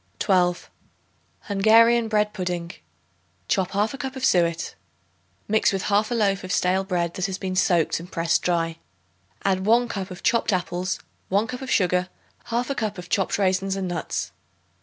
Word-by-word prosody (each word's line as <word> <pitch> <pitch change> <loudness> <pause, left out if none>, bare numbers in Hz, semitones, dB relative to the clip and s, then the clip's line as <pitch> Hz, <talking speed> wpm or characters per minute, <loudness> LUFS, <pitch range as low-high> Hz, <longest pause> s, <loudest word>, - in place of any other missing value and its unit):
12. 180 -3 +1 0.7
Hungarian 225 +3 +4
Bread 210 -1 +1
Pudding. 180 -3 -3 0.8
Chop 190 -3 +1
1/2 215 +7 0
cup 265 +1 -4
of 260 0 -1
suet. 170 -5 +1 0.7
Mix 220 +1 +3
with 195 -1 -2
1/2 210 +1 +2
loaf 200 -3 +1
of 185 - -5
stale 185 +2 +2
bread 175 -3 -1
that 185 +1 -2
has 190 -1 -4
been 185 -1 -4
soaked 175 -4 +2
and 175 +2 -11
pressed 165 0 +1
dry. 165 -2 -1 0.7
Add 190 -1 +1
1 240 +2 +4
cup 195 -4 -4
of 180 -1 -10
chopped 230 -1 +2
apples, 185 0 -1 0.3
1 200 +3 +2
cup 250 +2 -6
of 265 - -6
sugar, 180 -1 +2 0.4
1/2 240 +4 -1
cup 215 -4 -2
of 180 0 -9
chopped 195 -1 +1
raisins 190 0 +1
and 195 -1 -3
nuts. 175 -2 -3
190 Hz, 160 wpm, -24 LUFS, 180-215 Hz, 0.8 s, Hungarian